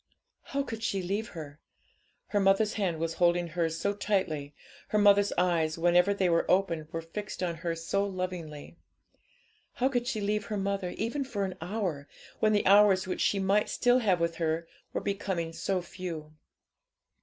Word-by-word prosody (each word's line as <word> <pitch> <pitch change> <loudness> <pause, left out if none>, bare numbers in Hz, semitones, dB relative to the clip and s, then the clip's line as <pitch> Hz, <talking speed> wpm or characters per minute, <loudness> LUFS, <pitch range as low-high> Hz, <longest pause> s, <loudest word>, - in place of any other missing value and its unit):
How 280 0 -1
could 225 -4 -6
she 195 -4 -1
leave 200 +5 -2
her? 150 -2 -8 0.7
Her 205 - +1
mother's 195 +2 +3
hand 185 -6 -1
was 165 +1 -2
holding 175 0 +2
hers 165 0 -1
so 200 +3 0
tightly, 165 -9 -1 0.3
her 215 - 0
mother's 205 -1 +5
eyes, 170 -3 +1
whenever 175 +3 +4
they 195 -2 +1
were 170 -1 +1
opened, 170 -5 +1
were 165 0 -4
fixed 195 +3 -6
on 170 -2 -2
her 165 0 -2
so 165 +4 -1
lovingly. 180 -6 -5 1.0
How 260 0 +1
could 245 -2 -1
she 225 - -1
leave 210 0 -1
her 210 - -2
mother, 195 -1 -1
even 235 +6 -1
for 205 -7 -2
an 190 - -4
hour, 175 -6 -3 0.3
when 215 - +3
the 205 -1 +2
hours 200 -1 +6
which 185 - -3
she 205 - +2
might 195 +2 +2
still 245 +1 +3
have 195 -7 +2
with 170 0 -1
her 165 0 -1 0.2
were - - -2
becoming 190 -5 -2
so 185 +1 -1
few? 170 -4 -7
185 Hz, 175 wpm, -29 LUFS, 165-205 Hz, 1.0 s, hours